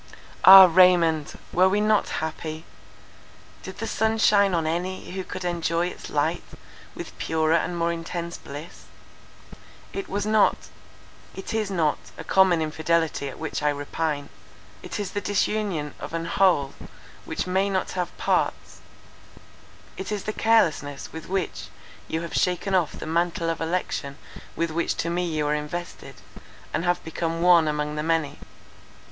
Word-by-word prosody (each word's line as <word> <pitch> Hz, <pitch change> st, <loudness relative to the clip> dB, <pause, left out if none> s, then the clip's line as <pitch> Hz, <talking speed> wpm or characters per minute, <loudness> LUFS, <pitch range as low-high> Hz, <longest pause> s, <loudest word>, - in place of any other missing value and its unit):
"Ah, 190 Hz, 0 st, +12 dB
Raymond, 170 Hz, -4 st, +4 dB, 0.2 s
were 185 Hz, +2 st, +5 dB
we 205 Hz, +2 st, +1 dB
not 215 Hz, 0 st, +2 dB
happy? 160 Hz, 0 st, -5 dB, 1.0 s
Did -, -, -9 dB
the -, -, -4 dB
sun 220 Hz, 0 st, 0 dB
shine 200 Hz, -4 st, +4 dB
on 165 Hz, -2 st, 0 dB
any, 180 Hz, +4 st, -3 dB
who 190 Hz, +1 st, -4 dB
could 185 Hz, 0 st, -7 dB
enjoy 170 Hz, 0 st, 0 dB
its -, -, -10 dB
light -, -, 0 dB, 0.5 s
with -, -, -8 dB
purer 160 Hz, 0 st, +1 dB
and 170 Hz, +1 st, 0 dB
more 170 Hz, 0 st, +1 dB
intense 170 Hz, +1 st, -5 dB
bliss? 145 Hz, +4 st, -10 dB, 1.1 s
It 390 Hz, -, -5 dB
was 205 Hz, +1 st, -2 dB
not—it 215 Hz, -2 st, -2 dB
is 220 Hz, -2 st, -1 dB
not 165 Hz, -6 st, 0 dB, 0.2 s
a -, -, -7 dB
common 180 Hz, -1 st, +3 dB
infidelity 160 Hz, -2 st, 0 dB
at -, -, -10 dB
which 160 Hz, -, -4 dB
I 150 Hz, -, +2 dB
repine. 145 Hz, 0 st, -3 dB, 0.5 s
It -, -, -6 dB
is 200 Hz, -2 st, -3 dB
the 205 Hz, -, -3 dB
disunion 200 Hz, -7 st, -1 dB
of -, -, -6 dB
an 165 Hz, 0 st, -3 dB
whole 165 Hz, -6 st, +2 dB, 0.5 s
which -, -, -3 dB
may 190 Hz, +2 st, +1 dB
not 190 Hz, -1 st, -1 dB
have 180 Hz, -2 st, -4 dB
parts; -, -, -1 dB, 1.2 s
it 190 Hz, -, -5 dB
is 205 Hz, -2 st, -3 dB
the 215 Hz, -, -3 dB
carelessness 160 Hz, -12 st, +1 dB
with 160 Hz, +1 st, -8 dB
which 190 Hz, -1 st, -3 dB, 0.4 s
you 160 Hz, -, -2 dB
have 170 Hz, -, -7 dB
shaken 180 Hz, +2 st, 0 dB
off 175 Hz, -5 st, +2 dB
the -, -, -7 dB
mantle 165 Hz, +1 st, 0 dB
of 165 Hz, -, -5 dB
election 160 Hz, -4 st, -3 dB, 0.4 s
with 170 Hz, -1 st, -1 dB
which 170 Hz, +2 st, -1 dB
to 170 Hz, -, -2 dB
me 180 Hz, +1 st, -1 dB
you 155 Hz, -2 st, -1 dB
were 145 Hz, -, +1 dB
invested, 150 Hz, +4 st, -5 dB, 0.6 s
and 165 Hz, +3 st, -1 dB
have 175 Hz, 0 st, 0 dB
become 165 Hz, +1 st, -3 dB
one 175 Hz, -3 st, +6 dB
among 150 Hz, 0 st, -2 dB
the -, -, -1 dB
many. 160 Hz, -2 st, -1 dB
170 Hz, 155 wpm, -25 LUFS, 160-190 Hz, 1.2 s, Ah